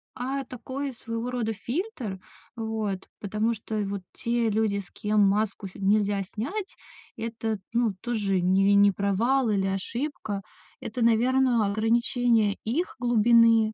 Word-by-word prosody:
а 265 +4 -2
такой 265 +2 -5
своего 230 +1 -4
рода 235 -3 -1
фильтр. 240 - -4 0.4
Вот, 220 -4 -3
потому 215 +3 0
что 220 +1 -6
вот 200 0 -4
те 235 -1 0
люди, 215 -1 +1
с 195 -3 -7
кем 210 0 +1
маску 200 0 +1
ф 190 - -9
нельзя 200 0 +2
снять 295 - -5 0.4
это, 225 -1 -3 0.2
ну, 230 -4 +1
тоже 210 -6 0
не 190 +3 +4
не 200 0 +6
провал 220 +7 +1
или 195 -2 +1
ошибка. 205 +2 -3 0.4
Это, 240 +3 -5
наверно, 240 0 +3
ограничение 225 0 +2
их 290 +12 -1
глубины, 230 -2 +5
220 Hz, 130 wpm, -26 LUFS, 200-240 Hz, 0.4 s, не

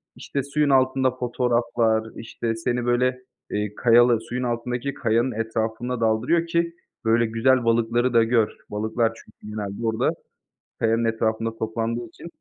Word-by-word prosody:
İşte, 140 - -4
suyun 145 +1 0
altında 130 -1 +3
fotoğraflar, 120 -2 0
işte, 115 0 -4
seni, 120 +2 -2
böyle, 125 +1 +1 0.3
eee, 105 0 -2
kayalı 120 -1 +5
suyun 125 +1 -2
altındaki 125 +2 -2
kayanın 120 +1 +1
etrafına 115 +2 -2
daldırıyor 120 +10 +2
ki, 170 0 0 0.3
böyle, 115 +1 +3
güzel 120 +3 +2
balıkları 120 +2 +2
da 115 -1 +6
gör. 115 -1 +2 0.2
Balıklar 110 +2 0
çünkü 105 -1 -13
genelde 105 +1 -4
orada 110 -1 +1 0.7
kayanın 115 +1 +2
etrafında 115 0 -1
toplandığı 115 +2 -2
için. 140 - -12
115 Hz, 135 wpm, -24 LUFS, 115-125 Hz, 0.7 s, da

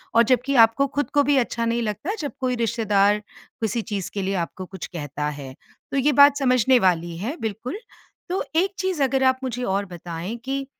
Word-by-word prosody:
और 230 - +7
जबकि 255 +3 +1
आपको 230 +4 +5
खुद 285 +1 -2
को 290 -1 +4
भी 285 +1 +2
अच्छा 235 -2 0
नहीं 235 +1 0
लगता, 225 - -3
जब 290 -3 -3
कोई 255 -1 0
रिश्तेदार 210 -3 +2 0.4
किसी 225 +1 0
चीज़ 205 -4 -4
के 200 - -2
लिए 195 +1 -1
आपको 185 - -9
कुछ 190 -2 -8
कहता 150 -3 -4
है। 140 -3 -8 0.4
तो 275 - -1
ये 285 +2 +3
बात 285 +1 +7
समझने 255 -1 +4
वाली 170 -3 +1
है, 235 - -4
बिल्कुल। 225 - -4 0.5
तो 370 - -1
एक 380 +4 +2
चीज़ 375 -6 -1
अगर 265 0 +1
आप 260 0 +4
मुझे 250 -1 -3
और 200 0 0
बताएँ 175 +3 -6
कि, 275 0 -2
235 Hz, 200 wpm, -23 LUFS, 195-270 Hz, 0.5 s, और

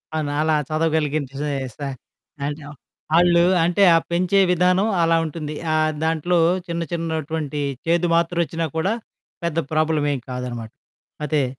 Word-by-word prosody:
అవునలా 155 +1 +1
చదవగలిగించే 150 -3 -1 0.2
సా 145 - -4 1.3
ఆళ్ళు 175 -1 +5 0.2
అంటే 175 +4 +3
ఆ - - +6
పెంచే 180 +3 +2
విధానం 180 +3 +3
అలా 165 0 +3
ఉంటుంది. 155 -1 -5 0.2
ఆహ్, 155 0 +2
దాంట్లో 165 +2 +1 0.3
చిన్న 170 0 -3
చిన్నటువంటి 160 -3 -3 0.2
చేదు 170 +1 +2
మాత్రొచ్చినా 170 -1 0
కూడా, 190 +7 +1 0.5
పెద్ద 170 -1 -2 0.2
ప్రాబ్లమేం 150 -3 +1
కాదనమాట. 120 -3 -5 0.6
అదే. 145 -2 +1
160 Hz, 110 wpm, -22 LUFS, 150-170 Hz, 1.3 s, ఆ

